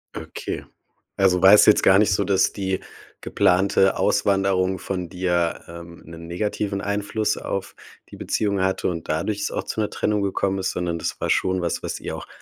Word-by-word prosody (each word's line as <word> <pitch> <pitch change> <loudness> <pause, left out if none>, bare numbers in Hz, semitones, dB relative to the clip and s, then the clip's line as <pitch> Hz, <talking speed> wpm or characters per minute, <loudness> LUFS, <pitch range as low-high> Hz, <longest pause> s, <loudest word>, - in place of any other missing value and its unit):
Okay, - - -6 0.5
also 95 -2 +3
war 95 +2 +9
es 105 - +7
jetzt 105 - +5
gar 95 +1 +6
nicht 105 -2 +3
so, - - +1
dass 95 -1 +2
die 95 -2 -2 0.4
geplante 95 +1 +2
Auswanderung 95 -2 +1
von 90 -2 -4
dir, 90 -2 -1
ähm, 85 0 -11
'nen 85 0 -11
negativen 100 +3 -3
Einfluss 105 +1 -1
auf 100 0 -5 0.3
die - - -11
Beziehung 100 -2 -1
hatte 95 0 0
und 85 -3 -4
dadurch 100 +7 -2
es - - -2
auch - - -3
zu 110 - -3
'ner 105 - -1
Trennung 105 -1 -1
gekommen 95 0 -1
ist, 95 -1 -1
sondern 85 -1 -2
das 80 - -4
war - - -1
schon 95 -1 +1
was, 85 - -2
was - - -4
ihr - - -5
auch - - -9
95 Hz, 190 wpm, -23 LUFS, 90-100 Hz, 0.5 s, war